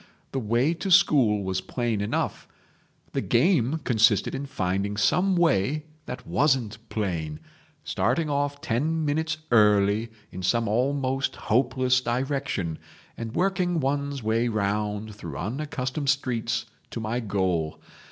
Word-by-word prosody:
The 135 - -1
way 120 +7 +1
to 170 +4 -4
school 130 - +5
was 95 0 -1
plain 115 +2 -2
enough; 100 - -2 0.6
the - - -1
game 150 - +2
consisted 110 -3 +3
in 140 +1 -4
finding 100 -2 -1
some 185 - +3
way 150 - +2 0.2
that 125 0 -6
wasn't 130 -7 +1
plain, 85 -8 -2 0.4
starting 165 -2 0
off 145 0 -1
ten 155 +7 0
minutes 155 +2 0
early 105 0 +4 0.2
in 95 - -7
some 115 +5 +1
almost 135 +4 0
hopeless 125 +1 +2
direction, 125 - -2 0.4
and 115 0 -6
working 180 -2 +1
one's 140 -1 -1
way 115 +2 +1
round 105 0 -1
through 85 -8 -7
unaccustomed 130 - -3
streets 130 -5 0 0.2
to - - -5
my 115 +2 -2
goal. 95 -8 -1
120 Hz, 125 wpm, -26 LUFS, 105-140 Hz, 0.6 s, school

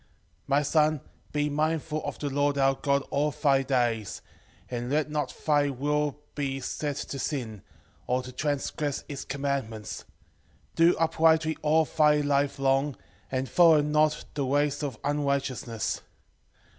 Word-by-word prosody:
4:5 - - -34 0.4
My 140 +1 +3
son, 155 0 +2 0.3
be 150 0 0
mindful 155 +1 -1
of - - -4
the 145 -2 -3
Lord 145 +1 +1
our 135 0 +4
God 140 0 0
all 145 +2 +2
thy 140 -2 +2
days, 120 -6 -1 0.4
and 120 0 -4
let 150 +1 0
not 150 -1 -1 0.2
thy 145 -2 +3
will 145 +2 -1 0.2
be 135 -2 -2
set 145 +2 -3
to 140 - -5
sin, 120 - -3 0.5
or 125 +1 0
to 125 - -8
transgress 145 +1 -2
his 140 -2 -6
commandments: 135 -6 -4 0.7
do 165 +1 +5
uprightly 160 -1 +3
all 155 +1 +3
thy 150 -1 +3
life 145 -1 +1
long, 135 +1 +1 0.4
and 130 0 -1
follow 165 -2 +6
not 150 +1 +1
the 145 - -1
ways 145 +2 +1
of 140 -6 -3
unrighteousness. 140 -5 -1
145 Hz, 145 wpm, -27 LUFS, 135-150 Hz, 0.7 s, follow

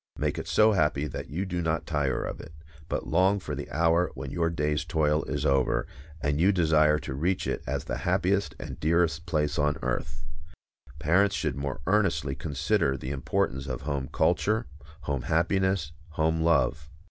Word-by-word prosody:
Make - - -1
it - - -6
so 110 +1 +5
happy 75 -6 +1
that 75 - -6
you 90 +6 -2
do 90 -2 -2
not 80 0 -1
tire 75 -4 0
of - - -5
it, 80 - -11 0.4
but - - -2
long 95 +5 +3
for - - -6
the - - -5
hour 80 +4 +2
when 65 0 -6
your 85 -1 +1
day's 75 -1 -1
toil 80 -2 +1
is 75 0 -2
over, 70 -3 +2 0.4
and 75 +1 0
you 95 +3 +5
desire 80 -4 +4
to 75 - -5
reach 85 +7 0
it - - -2
as - - -2
the - - -4
happiest 95 +6 0
and - - -7
dearest 80 0 +1
place 75 -2 0
on 75 0 +2
earth. 70 -2 -3 0.7
Parents 90 +6 +3
should 75 -5 -1
more 70 -1 -4
earnestly 90 -8 +1
consider 70 +1 0
the 65 +1 -5
importance 65 0 -1
of 65 -2 -4
home 70 -2 -3
culture, 110 +2 +1 0.4
home 70 -3 -2
happiness, 90 +1 +1 0.2
home 80 +1 +1
love. 80 -3 +2
80 Hz, 175 wpm, -27 LUFS, 70-85 Hz, 0.7 s, so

